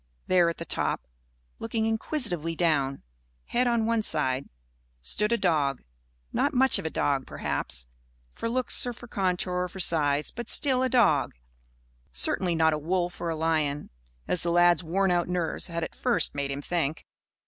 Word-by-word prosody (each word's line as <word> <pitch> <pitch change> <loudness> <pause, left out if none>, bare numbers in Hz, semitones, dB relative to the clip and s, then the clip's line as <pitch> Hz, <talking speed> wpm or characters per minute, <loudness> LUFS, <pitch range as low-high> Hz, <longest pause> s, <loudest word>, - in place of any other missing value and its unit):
There 175 -2 +4
at 170 - -5
the 170 - -6
top, - - 0 0.5
looking 225 -1 -2
inquisitively 220 - 0
down, 145 -5 0 0.4
head 250 +1 0
on 235 -2 +1
one 230 0 +1
side, 140 -8 0 0.5
stood 210 - +1
a 235 - +3
dog 150 - 0 0.5
not - - 0
much 265 +1 +5
of - - -4
a - - -2
dog, 140 -3 -1
perhaps, - - -2 0.5
for 230 - -4
looks 255 +1 +2
or 245 - -3
for 240 +1 -13
contour 185 -3 -1
or 180 0 -1
for 190 +2 -11
size, 150 -4 +2
but 240 -1 -7
still 260 -3 +3
a 260 - +1
dog; 205 - +2 0.8
certainly 170 - +1
not 160 -1 +3
a 150 - -2
wolf 175 +3 -2
or 170 - -2
a 165 - -2
lion, 155 -2 -1 0.4
as 180 - +1
the 170 - +1
lad's 175 0 +4
worn 190 +3 +1
out 175 -1 +1
nerves 175 -2 -2
had 170 -1 -4
at - - -5
first 245 -2 +1
made 140 -1 -3
him 140 +1 -4
think. 160 -3 -2
175 Hz, 175 wpm, -27 LUFS, 155-220 Hz, 0.8 s, much